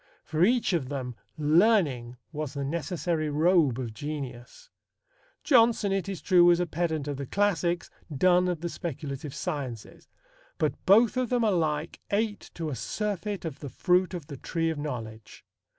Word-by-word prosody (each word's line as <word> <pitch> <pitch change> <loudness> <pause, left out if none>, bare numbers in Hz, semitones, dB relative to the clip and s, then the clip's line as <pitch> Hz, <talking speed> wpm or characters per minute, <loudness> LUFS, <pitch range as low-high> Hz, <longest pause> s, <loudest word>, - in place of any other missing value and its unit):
For 160 0 0
each 235 0 +3
of 145 -7 -1
them 130 -3 -4 0.2
learning 150 - +3
was 150 -2 -5
the 140 - -2
necessary 165 0 -2
robe 155 -3 +3
of 120 -4 -4
genius. 145 - -7 0.7
Jonson, 230 -6 +4
it 195 -1 -1
is 185 -6 -6
true, 180 -3 +5
was 175 0 +6
a 180 - +1
pedant 160 -3 -2
of 145 -2 -3
the 140 -1 -5
classics, 175 -3 0 0.2
Donne 180 +5 +3
of 175 -3 -2
the 170 - -2
speculative 150 -4 -5
sciences; 130 -7 -5 0.5
but - - +1
both 225 +5 +5
of 255 -2 0
them 245 -2 +1
alike 165 -6 0
ate 205 0 -1
to 165 -2 -3
a - - -3
surfeit 200 - -3
of 155 -3 -5
the 145 - -6
fruit 180 +5 +1
of 170 -5 -6
the 140 -1 -8
tree 165 +4 -1
of 155 - -5
knowledge. 115 -7 -7
165 Hz, 165 wpm, -28 LUFS, 140-185 Hz, 0.7 s, was